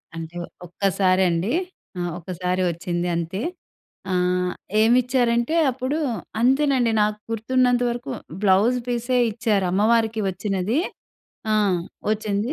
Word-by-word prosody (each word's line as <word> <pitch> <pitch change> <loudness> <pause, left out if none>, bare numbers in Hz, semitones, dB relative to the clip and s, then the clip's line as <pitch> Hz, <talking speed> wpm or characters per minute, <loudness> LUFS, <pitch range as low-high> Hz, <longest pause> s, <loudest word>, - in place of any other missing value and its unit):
అంటే 165 +1 -7 0.3
ఒక్కసారండి. 185 - +1 0.5
ఆ! - - -1 0.2
ఒకసారి 180 +1 -2
వచ్చింది 175 +1 -3
అంతే. 170 +5 -3 0.7
ఆహ్, 180 0 +1 0.3
ఏమిచ్చారంటే 240 +3 +2 0.2
అప్పుడు, 260 +4 -2 0.4
అంతేనండి 260 -1 +3
నాకు 210 0 +1
గుర్తున్నంత 245 +2 +2
వరకు 245 +3 -4 0.3
బ్లౌజ్ 210 +5 +4
పీసే 245 +1 0
ఇచ్చారు 210 -3 0
అమ్మవారికి 220 +3 +2
వచ్చినది. 195 - -1 0.7
ఆ! - - +3 0.6
వచ్చింది. 215 +3 -1
215 Hz, 95 wpm, -23 LUFS, 185-245 Hz, 0.7 s, బ్లౌజ్